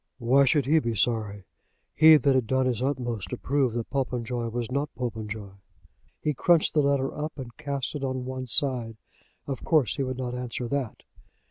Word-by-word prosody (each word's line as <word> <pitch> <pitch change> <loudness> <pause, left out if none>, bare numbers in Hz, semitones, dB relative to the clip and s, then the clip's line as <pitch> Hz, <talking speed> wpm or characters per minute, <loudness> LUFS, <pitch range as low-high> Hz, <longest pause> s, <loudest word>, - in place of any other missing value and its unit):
Why 135 +3 +4
should 140 0 +2
he 160 +4 +4
be 115 -6 -2
sorry, 105 -2 0 0.5
he 155 0 +8
that 140 -2 +2
had 130 -4 +1
done 130 +1 +1
his 125 -2 -1
utmost 125 -6 -2
to 125 - -4
prove 135 -3 0
that 115 -1 -4
Popenjoy 125 -3 -2
was 120 +1 -4
not 140 +3 -1
Popenjoy? 110 -4 -5 0.7
He 150 - -1
crunched 165 +4 +3
the 150 - +4
letter 140 -1 +1
up 150 +1 -4
and 125 -4 -8
cast 140 -4 -3
it 145 -2 -5
on 130 -1 -2
one 130 0 -5
side. 120 -3 0 0.5
Of 135 -2 -5
course 155 -7 +2
he 140 - 0
would 130 -1 -3
not 125 -1 -3
answer 125 -1 -4
that. 140 -5 -3
130 Hz, 190 wpm, -26 LUFS, 120-140 Hz, 0.7 s, he